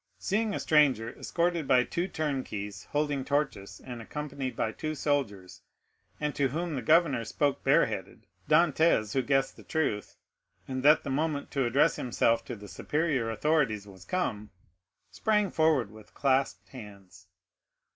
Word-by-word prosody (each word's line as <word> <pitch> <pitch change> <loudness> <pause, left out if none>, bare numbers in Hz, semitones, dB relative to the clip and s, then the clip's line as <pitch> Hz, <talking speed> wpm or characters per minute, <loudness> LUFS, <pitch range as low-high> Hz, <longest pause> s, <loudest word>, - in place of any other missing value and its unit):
Seeing 210 +1 -1
a - - -2
stranger, 135 -7 +3
escorted 170 -3 -1
by 125 -2 +5
two 175 +8 -2
turnkeys 110 - -4
holding 145 -2 -1
torches 135 -9 -2
and 120 -2 -7
accompanied 140 +1 -5
by 110 - -1
two 155 +6 -4
soldiers, 125 -11 -2 0.6
and 150 -1 -1
to 140 -2 +1
whom 165 +5 -3
the 135 - -2
governor 150 -2 +3
spoke 140 +4 -1
bareheaded, - - +1 0.2
Dantès, 160 -8 +3
who 135 - +2
guessed 135 +1 0
the - - -13
truth, 145 -10 -2 0.5
and 130 -1 -3
that 150 +3 +5
the 140 - -4
moment 150 +1 -1
to 135 -2 0
address 140 +7 +3
himself 115 -1 +1
to 125 - -6
the 105 -1 -11
superior 140 - -1
authorities 115 -4 +1
was 95 -2 -13
come, 110 - -2 0.6
sprang 210 -2 +1
forward 155 -9 +2
with 110 -1 -16
clasped 135 -1 0
hands. 100 -7 -12
135 Hz, 145 wpm, -29 LUFS, 115-155 Hz, 0.6 s, by